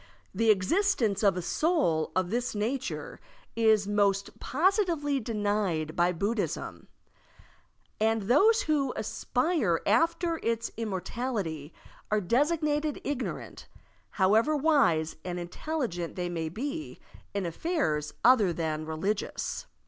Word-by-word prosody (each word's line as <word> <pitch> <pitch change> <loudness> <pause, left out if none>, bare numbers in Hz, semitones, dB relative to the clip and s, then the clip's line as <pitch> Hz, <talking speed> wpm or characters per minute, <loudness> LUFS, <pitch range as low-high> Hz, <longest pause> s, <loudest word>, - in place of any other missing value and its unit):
The 225 0 +1
existence 215 - +2
of 200 -4 +3
a 180 - -3
soul 275 - +1
of 185 0 0
this 240 0 -1
nature 245 +6 -3 0.4
is 220 -3 +3
most 200 -1 +1
positively 330 - +1
denied 205 -8 -1
by 175 +1 +3
Buddhism. 200 +5 -3 1.1
And 220 0 +2
those 415 - +4
who 285 -4 0
aspire 245 - 0
after 330 - +2
its 230 0 -1
immortality 200 - -3 0.4
are 215 - +2
designated 295 - +1
ignorant, 275 -3 -5 0.4
however 220 +10 +3
wise 260 - +2
and 180 -1 -4
intelligent 175 - -4
they 180 -1 -2
may 165 -2 -3
be 285 - -5 0.4
in 200 -2 -1
affairs 170 - -1
other 230 -7 +6
than 155 -2 -3
religious. 190 +7 -3
220 Hz, 110 wpm, -28 LUFS, 180-290 Hz, 1.1 s, other